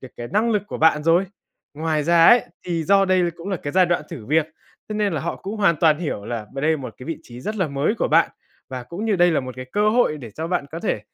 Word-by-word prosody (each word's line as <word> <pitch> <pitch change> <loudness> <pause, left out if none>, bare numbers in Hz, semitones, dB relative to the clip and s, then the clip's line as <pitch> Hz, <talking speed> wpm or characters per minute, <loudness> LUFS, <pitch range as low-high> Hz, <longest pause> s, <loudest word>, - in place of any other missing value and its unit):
được 130 - -10
cái 120 0 -6
năng 220 +4 +2
lực 210 -3 +1
của - - -6
bạn 155 -1 +4
rồi. 165 +4 +3 0.5
Ngoài 155 0 -1
ra 170 +1 +5
ấy, 240 -2 +7 0.2
thì 170 -2 -1
do 195 +3 +4
đây 185 -2 +2
cũng 170 +3 -8
là 190 - -1
cái 145 -2 -6
giai 185 -1 +4
đoạn 175 -2 0
thử 130 -11 -9
việc, 155 +2 +2 0.4
thế 215 - -4
nên 210 -3 0
là 155 - -2
họ 170 - -3
cũng 200 +3 -6
hoàn 195 -6 +3
toàn 155 0 +3
hiểu 145 -12 -4
là 115 -2 -5
b 135 - -7
đây 155 +3 +2
một 130 -6 -8
cái 125 - -10
vị 165 - -4
trí 120 -3 -11
rất 215 +11 -4
là 185 -6 0
mới 140 +8 0
của - - -1
bạn 165 +2 +4 0.4
và 130 -1 -6
cũng 170 - -6
như 215 -3 +1
đây 175 0 +4
là 160 - +1
một 130 -1 -7
cái 130 - -6
cơ 210 +1 +3
hội 230 -9 +2
để 120 -5 -9
cho 160 +10 -5
bạn 175 -4 -1
có 165 - -5
thể 105 - -1
165 Hz, 290 wpm, -22 LUFS, 145-190 Hz, 0.5 s, ấy